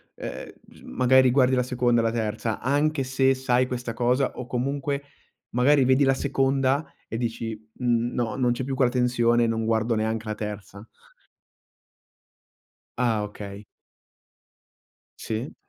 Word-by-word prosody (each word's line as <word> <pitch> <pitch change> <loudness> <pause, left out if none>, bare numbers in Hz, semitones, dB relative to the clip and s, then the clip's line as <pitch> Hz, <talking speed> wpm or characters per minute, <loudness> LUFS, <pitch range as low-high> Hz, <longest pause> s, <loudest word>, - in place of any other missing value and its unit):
ehm, - - -7
bs - - -19
magari 130 0 +4
guardi 130 -1 +3
la 125 - +2
seconda 120 -1 +1
e - - -2
la 115 - +1
terza? 110 -1 -2
Anche 145 +1 +1
se, 130 +1 +2
sai 130 -1 +1
questa 120 -2 -4
cosa, 125 +3 +1
o 125 - -6
comunque 140 +3 -2 0.5
magari 135 +2 +4
vedi 130 +2 +4
la 135 - +4
seconda, 135 +1 +1 0.2
e 115 - -4
dici: 115 -1 -3 0.3
"N 120 -1 +1
no, 120 -2 -2
non 125 -2 +1
c'è 120 +2 -2
più 135 - -3
quella 130 -2 +2
tensione, 120 -2 +2
non 115 0 -1
guardo 115 +1 +1
neanche 110 +1 -2
la 105 - -2
terza." 105 -1 -7 2.1
Ah, 115 -4 +1
okay. 100 0 -8 1.5
Sì. 115 +5 -5
125 Hz, 140 wpm, -25 LUFS, 115-130 Hz, 2.1 s, magari